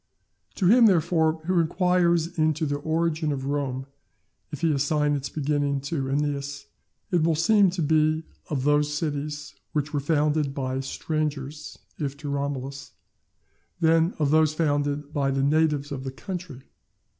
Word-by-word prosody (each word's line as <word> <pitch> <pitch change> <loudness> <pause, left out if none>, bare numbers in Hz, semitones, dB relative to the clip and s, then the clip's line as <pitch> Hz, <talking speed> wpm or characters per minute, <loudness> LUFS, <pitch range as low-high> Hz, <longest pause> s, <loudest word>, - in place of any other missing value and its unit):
To 190 - -1
him, 230 +5 +7
therefore, 160 -3 +2
who 180 0 +2
inquires 175 0 +2
into 155 0 +1
the 145 -1 -1
origin 160 0 0
of 135 -2 -3
Rome, 135 -2 -2 0.7
if 150 - -6
he 165 -1 +3
assign 145 +1 +1
its 140 -1 -2
beginning 145 -1 0
to 140 0 -2
Æneas, 140 0 -2 0.5
it 175 -3 +3
will 160 0 +2
seem 200 +4 +4
to 175 -2 -2
be 155 +1 +2 0.3
of 140 -4 -1
those 150 +1 +2
cities 150 -1 -3 0.2
which 150 0 -1
were 145 - +1
founded 150 -1 +1
by 130 -1 -2
strangers 150 0 -4 0.2
if 140 -2 -3
to 145 0 -6
Romulus, 140 -1 -4 0.9
then 165 +1 +3
of 150 -2 +1
those 155 -1 +3
founded 145 -2 -1
by 140 -1 +1
the 135 0 0
natives 150 -1 +2
of 135 -2 -4
the 135 - -4
country. 170 -3 -7
150 Hz, 150 wpm, -25 LUFS, 140-160 Hz, 0.9 s, him